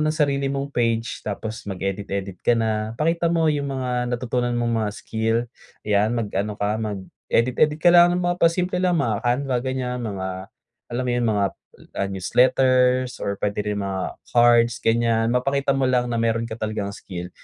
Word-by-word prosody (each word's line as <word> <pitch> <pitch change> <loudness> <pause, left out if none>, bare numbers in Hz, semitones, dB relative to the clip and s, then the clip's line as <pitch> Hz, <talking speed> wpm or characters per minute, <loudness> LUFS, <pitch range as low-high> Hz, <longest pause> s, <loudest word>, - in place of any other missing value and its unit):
ng 155 0 0
sarili 140 -3 +1
mong 140 +1 -3
page 115 -1 -1
tapos 110 +2 -5
mag-edit-edit 95 0 -3
ka 120 - +3
na. 110 0 -1
Ipakita 165 +2 +1
mo 165 -1 +2
yung 145 -2 0
mga 125 -2 -2
natutunan 125 0 -1
mong 120 -1 0
mga 105 - -1
skill, 110 +1 -2 0.5
yan 105 +1 +2
mag-ano 105 -1 -2
ka 105 +1 0
mag-edit-edit 115 +7 0
ka 175 - +5
lang 175 0 +8
ng 180 - 0
mga 175 0 +1
pa-simple 180 +2 +2
lang 180 -2 +2
mga 115 -3 -1
Canva 125 +1 +1
ganyan, 125 -2 -2
mga 95 -1 -5 0.4
alam 125 +2 -2
mo - - 0
yun, 120 -1 0
mga 100 -1 +1 0.5
ah, 100 - -1
newsletters 125 +5 +2
or 100 0 -2
pwede 105 0 -1
rin 105 - -2
mga 95 -2 -3 0.2
cards 120 -1 +4
ganyan, 115 0 +2
mapakita 135 +3 +1
mo 135 -1 +1
lang 125 -1 +1
na 115 - -1
meron 115 0 0
ka 110 - -7
talagang 105 -2 -3
skill. 90 -2 -8
120 Hz, 170 wpm, -23 LUFS, 105-130 Hz, 0.5 s, lang